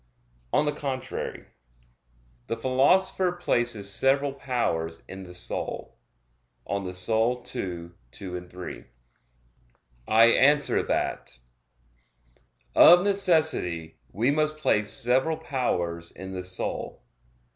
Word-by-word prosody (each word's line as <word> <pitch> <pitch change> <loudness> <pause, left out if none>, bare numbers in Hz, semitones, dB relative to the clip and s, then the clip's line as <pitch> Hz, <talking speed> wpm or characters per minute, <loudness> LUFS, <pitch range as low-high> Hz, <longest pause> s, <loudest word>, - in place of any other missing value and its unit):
On 150 - +2
the 150 - +1
contrary, 135 -3 -5 1.0
The 115 - -2
Philosopher 175 +9 +2
places 120 - 0
several 140 +4 +2
powers 100 -12 -2
in 95 0 -9
the 90 -1 -11
soul 90 - -4 0.7
(De - - -8
Anima 100 -1 -2
ii, 90 - -5 1.2
2,3). 90 +3 -8 1.2
I 110 +1 +6
answer 145 +5 +4
that, 65 - -3 1.4
Of 175 +1 +8
necessity 160 - +1
we 115 +8 +1
must 155 +1 0
place 105 -9 +1
several 130 +6 +2
powers 90 - -2
in 95 +1 -9
the 95 -1 -5
soul. 90 0 -4
120 Hz, 95 wpm, -26 LUFS, 90-150 Hz, 1.4 s, Of